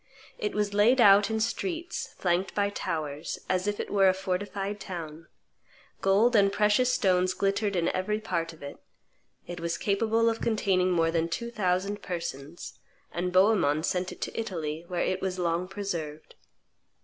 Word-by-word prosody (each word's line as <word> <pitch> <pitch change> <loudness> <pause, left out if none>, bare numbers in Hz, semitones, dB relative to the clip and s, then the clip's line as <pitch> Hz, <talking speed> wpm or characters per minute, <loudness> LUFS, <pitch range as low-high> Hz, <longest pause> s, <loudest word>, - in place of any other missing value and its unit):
It 210 - -2
was 210 -1 0
laid 220 +6 +4
out 205 -2 +7
in 220 0 -1
streets, 335 - -3
flanked 180 +1 0
by 200 0 +1
towers, 155 -5 -4
as 185 +1 0
if 205 0 -1
it - - -4
were 195 -2 +5
a 185 - +2
fortified 195 +2 -3
town; 165 -4 -7 0.7
gold 210 +5 +3
and 200 -2 +5
precious 210 +5 +3
stones 185 -6 +2
glittered 200 +1 0
in 170 -1 +1
every 210 +3 -1
part 170 -6 -2
of 160 -3 -15
it; 140 - -8 0.7
it 175 0 -7
was 170 0 -2
capable 225 +3 +1
of 225 0 0
containing 190 -5 +1
more 165 -2 +2
than 165 0 0
two 235 +8 -4
thousand 195 -1 -1
persons; 165 -3 -6 0.3
and 180 +1 -2
Bohemond 185 -6 +3
sent 180 0 -1
it - - -11
to - - -4
Italy, 165 -7 -4
where 180 -1 -1
it 185 - -1
was 185 -1 -2
long 175 0 -1
preserved. 170 -6 -5
190 Hz, 165 wpm, -28 LUFS, 170-210 Hz, 0.7 s, out